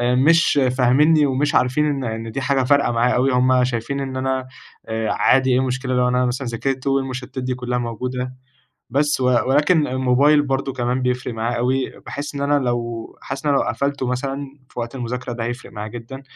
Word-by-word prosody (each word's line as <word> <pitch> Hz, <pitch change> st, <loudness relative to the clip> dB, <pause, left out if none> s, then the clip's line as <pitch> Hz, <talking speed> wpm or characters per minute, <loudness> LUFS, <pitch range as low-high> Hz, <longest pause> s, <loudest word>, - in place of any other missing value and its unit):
مش 155 Hz, +3 st, +4 dB, 0.2 s
فاهمينني 145 Hz, +5 st, +4 dB
ومش 140 Hz, +2 st, 0 dB
عارفين 130 Hz, +4 st, +2 dB
إن 140 Hz, -3 st, -1 dB
إن 115 Hz, -1 st, -4 dB
دي 135 Hz, -, -3 dB
حاجة 135 Hz, 0 st, +1 dB
فارقة 140 Hz, 0 st, +3 dB
معايا 120 Hz, +1 st, +2 dB
أوي، 130 Hz, +2 st, +2 dB
همّ 125 Hz, 0 st, +3 dB
شايفين 125 Hz, +3 st, -2 dB
إن 135 Hz, -1 st, -4 dB
أنا 130 Hz, 0 st, -1 dB, 0.4 s
آآ، 110 Hz, 0 st, -1 dB
عادي 130 Hz, 0 st, +3 dB
إيه 125 Hz, -, +3 dB
المشكلة 130 Hz, 0 st, -1 dB
لو 125 Hz, 0 st, +3 dB
أنا 125 Hz, 0 st, +2 dB
مثلًا 125 Hz, +1 st, -2 dB
ذاكرت 130 Hz, +3 st, -3 dB
والمشتتات 130 Hz, -1 st, -2 dB
دي 125 Hz, 0 st, -1 dB
كلها 125 Hz, 0 st, -2 dB
موجودة؟ 125 Hz, +2 st, -4 dB, 0.6 s
بس 145 Hz, +2 st, +1 dB
و 130 Hz, -, 0 dB, 0.2 s
ولكن 150 Hz, +3 st, +3 dB
الموبايل 130 Hz, +4 st, +3 dB
برضو 135 Hz, -1 st, -1 dB
كمان 125 Hz, 0 st, -1 dB
بيفرِق 125 Hz, -1 st, -1 dB
معايا 115 Hz, +2 st, -2 dB
أوي، 130 Hz, +2 st, -1 dB
باحس 145 Hz, +1 st, -5 dB
إن 140 Hz, -, -4 dB
أنا 145 Hz, +1 st, +2 dB
لو 120 Hz, -3 st, -2 dB, 0.2 s
حاسس 135 Hz, +2 st, -6 dB
إن -, -, +3 dB
أنا 140 Hz, -, +3 dB
لو -, -, 0 dB
قَفلته 140 Hz, -2 st, -1 dB
مثلًا 135 Hz, +2 st, -2 dB, 0.3 s
في -, -, -12 dB
وقت 115 Hz, +2 st, -5 dB
المذاكرة 125 Hz, 0 st, -4 dB
ده 115 Hz, -1 st, -4 dB
هيفرِق 120 Hz, +2 st, -6 dB
معايا 105 Hz, 0 st, -6 dB
جدًا، 120 Hz, +4 st, -8 dB
130 Hz, 195 wpm, -21 LUFS, 125-135 Hz, 0.6 s, مش